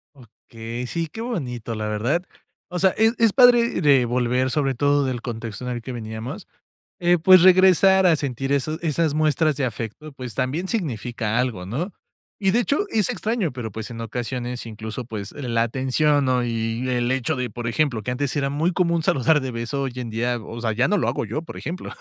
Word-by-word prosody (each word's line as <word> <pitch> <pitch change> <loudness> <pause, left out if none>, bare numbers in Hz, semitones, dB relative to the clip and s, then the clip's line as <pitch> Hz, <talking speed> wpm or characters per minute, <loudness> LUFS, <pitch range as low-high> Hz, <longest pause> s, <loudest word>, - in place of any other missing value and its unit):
Okey. 115 -1 -8
Sí, 165 +4 -2
qué 225 +9 -8
bonito, 125 - -4
la 110 0 -3
verdad. 120 +11 0 0.5
O 180 - -3
sea, 190 0 +4
es 225 +1 +4
es 225 -3 +3
padre 240 -4 +5
re 140 -4 +5
volver, 125 +1 +1
sobre 135 -2 0
todo 145 +2 +2
del 125 -2 -2
contexto 115 0 -6
en 125 - -3
el 120 - -5
que 130 - -7
veníamos, 115 - -6 0.5
eh, 175 0 +3
pues, 185 +2 +7
regresar 190 +1 +6
a 170 -3 +6
sentir 135 -2 -3
eso 150 +3 0
esas 160 -1 0
muestras 155 0 +2
de 135 -1 0
afecto, 120 +6 -6
pues, 125 -4 -7
también 140 +8 -1
significa 120 - -2
algo, 115 -8 -1
¿no? 145 - -3 0.5
Y, 195 -2 +2
de 230 - +3
hecho, 280 +4 +1
es 215 - +1
extraño, 215 -6 -1
pero, 120 -3 -5
pues, 110 +3 -6
en 115 -1 -7
ocasiones 120 +1 -4
incluso, 110 +1 -6
pues, 105 -4 -6
la 115 -4 -1
atención, 135 +4 +1
¿no? 125 -1 +2
Y 115 +1 -2
el 120 -1 0
hecho 130 +4 0
de, 125 -1 -2
por 120 -1 -6
ejemplo, 120 -2 0
que 125 - -2
antes 135 +2 -2
era 140 -2 0
muy 155 +6 0
común 170 -2 +1
saludar 150 0 +3
de 130 -2 -4
beso, 120 +4 -3
hoy 135 -2 -3
en 125 -2 -5
día, 120 +2 -1
o 115 +1 -8
sea, 115 -2 -1
ya 125 +4 +2
no 205 - +2
lo - - 0
hago - - -1
yo, 115 +9 -3
por 165 - -10
ejemplo. 175 +3 -6
130 Hz, 205 wpm, -23 LUFS, 120-160 Hz, 0.5 s, pues